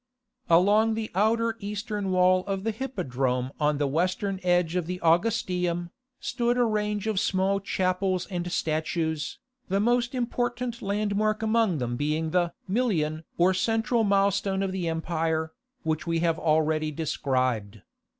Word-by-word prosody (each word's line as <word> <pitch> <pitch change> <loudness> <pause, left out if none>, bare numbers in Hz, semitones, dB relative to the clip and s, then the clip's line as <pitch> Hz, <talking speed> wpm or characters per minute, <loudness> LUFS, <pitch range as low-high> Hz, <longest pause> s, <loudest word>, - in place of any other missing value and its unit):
Along 205 +6 +4
the 220 -1 -4
outer 225 +4 +2
eastern 205 -1 -3
wall 185 0 +4
of 195 -1 -2
the 225 - 0
Hippodrome 135 - -2
on 150 -1 +2
the 145 - +1
western 185 +6 0
edge 175 -1 +2
of 180 -3 -1
the 180 0 -4
Augustaeum, 175 -1 +1 0.3
stood 240 0 0
a 245 - +4
range 210 -2 -1
of 215 -3 0
small 195 +1 +1
chapels 185 -1 0
and 175 -1 -3
statues, 160 -1 -1 0.3
the 195 +1 +1
most 240 +3 +1
important 245 0 -2
landmark 210 +1 0
among 220 -5 +2
them 120 -2 -2
being 155 +3 -1
the 175 -1 +2 0.2
Milion 165 -8 0
or 180 +2 +4
central 225 +4 +1
milestone 195 -1 +2
of 195 - -1
the 185 -2 -2
empire, 160 -1 -1 0.3
which 160 +1 -2
we 165 0 +1
have 165 -1 +1
already 155 -1 +2
described. 130 - -1
185 Hz, 140 wpm, -27 LUFS, 160-210 Hz, 0.3 s, Along